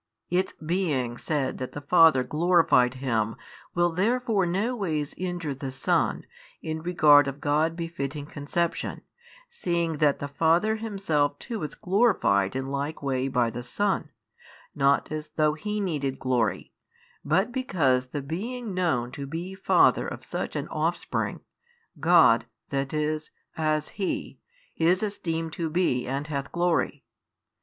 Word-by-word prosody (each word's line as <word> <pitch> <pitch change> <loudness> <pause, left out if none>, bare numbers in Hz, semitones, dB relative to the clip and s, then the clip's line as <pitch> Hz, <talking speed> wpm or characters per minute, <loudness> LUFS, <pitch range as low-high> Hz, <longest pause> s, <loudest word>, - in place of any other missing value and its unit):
Its 185 +2 +1
being 155 -8 -1
said 140 0 -2
that 130 - -5
the - - -5
Father 160 -3 +5
glorified 150 -6 +3
Him 115 -4 -1 0.4
will 175 0 +3
therefore 215 +1 +1
no 205 +8 0
ways 155 -9 -2
injure 175 -5 -3
the 135 0 -5
Son, 130 +1 0 0.4
in 160 0 -4
regard 150 -4 +5
of 140 +1 -5
God 155 +3 +1
befitting 150 -4 -4
conception, 155 +4 -2 0.5
seeing 170 - -1
that 145 -2 +3
the 140 - -4
Father 165 +9 +2
Himself 195 -10 0
too 225 -5 -6
is 150 - -5
glorified 180 - +2
in 130 0 -2
like 140 +3 -4
way 130 -1 0
by 125 -3 +1
the 120 - -5
Son, 175 +5 -1 0.6
not 140 +2 +2
as 155 0 -4
though 155 -1 +3
He 210 +7 -3
needed 145 -9 -2
glory, 120 -5 -1 0.5
but 185 +10 +1
because 150 - +1
the 140 +2 -5
being 215 - -4
known 155 -10 0
to 140 +1 -6
be 170 +6 -5
Father 190 - +3
of - - -7
such - - -4
an - - -2
Offspring, - - -2 0.6
God, - - +5 0.2
that 135 -1 -2
is, 155 0 -1 0.3
as 155 -1 0
He, 195 -2 -4 0.4
is 180 +5 +3
esteemed 165 -6 -3
to 165 -2 -2
be 155 -8 +1
and 135 +3 -2
hath 140 -2 -4
glory. 175 -1 0
155 Hz, 140 wpm, -26 LUFS, 140-180 Hz, 0.6 s, Father